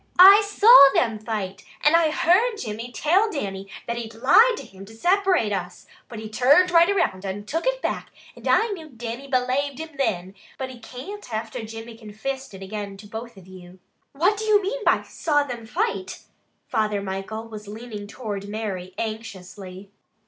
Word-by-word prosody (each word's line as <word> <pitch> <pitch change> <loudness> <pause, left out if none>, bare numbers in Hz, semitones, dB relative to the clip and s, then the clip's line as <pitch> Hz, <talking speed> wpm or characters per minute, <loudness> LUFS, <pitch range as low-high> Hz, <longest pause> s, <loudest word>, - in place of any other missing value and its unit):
"I 390 +3 +10
saw 410 - +8
them 225 -3 +1
fight, 210 -4 -5 0.2
and 300 +3 +5
I 335 -2 +4
heard 380 +10 +3
Jimmy 230 - -6
till 365 - +2
Dannie 195 -8 -4 0.2
that 235 0 -3
he'd 225 -1 -6
lied 435 - +5
to - - -8
him 190 0 -13
to 220 +2 -14
separate 360 - +2
us, 180 -2 -5 0.2
but 230 - -8
he 220 0 -6
turned 280 +12 +4
right 340 +1 +6
around 200 - 0
and 200 +1 -5
took 325 - -2
it - - -1
back - - -3 0.3
and - - -9
I 455 - +3
knew 330 -7 -7
Dannie 240 +1 -7
belaved 260 +2 0
him 320 +1 -6
thin; 220 - -2 0.2
but 260 -1 -5
he 250 - -12
can't 255 - -9
after 220 0 -4
Jimmy 225 +1 -9
confissed 225 +3 -6
it 190 - -9
again 200 0 -6
to 205 - -13
both 225 +2 -8
of 190 - -14
you." 185 -1 -13 0.4
"What 360 +9 +2
do 435 - -3
you 425 -1 +5
mean 425 +5 -3
by - - +3
'saw 295 -3 0
them 240 -5 -7
fight?'" 415 - -3 0.4
Father 215 -2 0
Michael 200 +3 -5
was 215 -2 -10
leaning 215 -1 -8
toward 205 -3 -6
Mary 195 -4 -5
anxiously. 200 -3 -7
230 Hz, 180 wpm, -24 LUFS, 205-320 Hz, 0.4 s, I